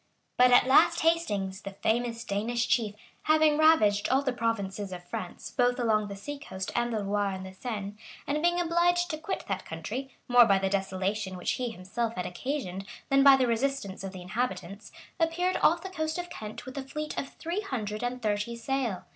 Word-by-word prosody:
] - - -46
But 250 0 +7
at 245 - +7
last 260 - +5
Hastings, 210 - 0
the 195 - -7
famous 230 +1 0
Danish 230 +4 -1
chief, 215 -4 +1 0.3
having 310 -1 +4
ravaged 215 -11 +4
all 270 +2 +3
the 260 -2 0
provinces 205 -4 -2
of 180 -1 -7
France, 175 0 -6
both 245 -1 +2
along 215 -3 +2
the 200 - -6
sea 285 +9 -7
coast 190 -9 -6
and 240 0 +1
the 215 -2 -1
Loire 200 0 0
and 190 0 -8
Seine, 205 -2 -4 0.3
and 300 +1 -1
being 345 +1 +2
obliged 350 +1 +2
to 310 - -4
quit 320 +5 -4
that 195 -1 -2
country, 215 - -5 0.2
more 245 -1 +7
by 195 -3 +4
the 190 0 -1
desolation 190 0 -1
which 180 - -1
he 250 -1 -2
himself 225 +3 -3
had 180 - -3
occasioned, 195 -3 -4 0.2
than 275 0 +5
by 275 0 +9
the 260 -1 +2
resistance 235 -5 -1
of 195 - -5
the 185 -2 -9
inhabitants, 205 -1 -4 0.3
appeared 345 +3 +1
off 340 +2 +4
the 380 - -5
coast 315 -2 -2
of 350 0 -5
Kent 215 +3 -7
with 260 - -8
a - - -4
fleet 300 +3 -5
of 275 - -6
three 345 +5 -3
hundred 215 - -4
and 245 0 -3
thirty 210 +2 -1
sail. 235 -4 -2
235 Hz, 200 wpm, -29 LUFS, 200-280 Hz, 0.3 s, by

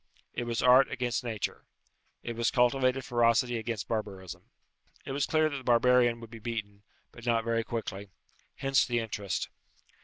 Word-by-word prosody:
It 120 - -3
was 115 -1 -1
art 130 +2 +7
against 125 -2 -2
nature. 110 -4 -4 0.6
It 120 - -4
was 115 0 +1
cultivated 130 +1 +2
ferocity 120 0 +2
against 110 -2 -4
barbarism. 100 -5 -5 0.6
It - - -5
was 140 +1 0
clear 155 0 +3
that 145 -2 -3
the 130 - -8
barbarian 120 0 +4
would 115 -1 -11
be 115 - -9
beaten, 105 -3 -5 0.3
but 120 - -13
not 115 -1 +2
very 115 0 0
quickly. 105 -4 -5 0.5
Hence 135 0 +2
the 120 -1 -1
interest. 105 -4 -3
120 Hz, 160 wpm, -29 LUFS, 110-125 Hz, 0.6 s, art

